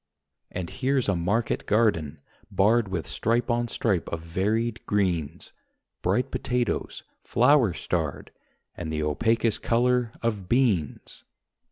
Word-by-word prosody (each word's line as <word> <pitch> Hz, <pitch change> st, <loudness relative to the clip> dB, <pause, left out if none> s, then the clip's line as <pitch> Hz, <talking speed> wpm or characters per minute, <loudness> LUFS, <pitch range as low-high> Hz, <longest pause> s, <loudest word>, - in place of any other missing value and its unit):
And 90 Hz, -2 st, -5 dB
here's 135 Hz, -1 st, 0 dB
a 100 Hz, -, +2 dB
market 100 Hz, +7 st, -1 dB
garden, 80 Hz, -10 st, +1 dB, 0.3 s
barred 110 Hz, +3 st, +3 dB
With 90 Hz, -6 st, -3 dB
stripe 120 Hz, -, 0 dB
on 120 Hz, 0 st, 0 dB
stripe 100 Hz, -6 st, -1 dB
of 85 Hz, -, -4 dB
varied 105 Hz, +7 st, -1 dB
greens... 90 Hz, -7 st, -1 dB, 0.5 s
Bright 100 Hz, +8 st, 0 dB
potatoes, 125 Hz, -2 st, -2 dB, 0.2 s
flower 125 Hz, -5 st, +3 dB
starred, -, -, -3 dB, 0.4 s
And 80 Hz, -2 st, -6 dB
the 80 Hz, -1 st, -1 dB
opacous 115 Hz, +8 st, +1 dB
colour 125 Hz, 0 st, +1 dB
of 105 Hz, -6 st, -2 dB
beans. 110 Hz, -, 0 dB
110 Hz, 120 wpm, -26 LUFS, 90-120 Hz, 0.5 s, barred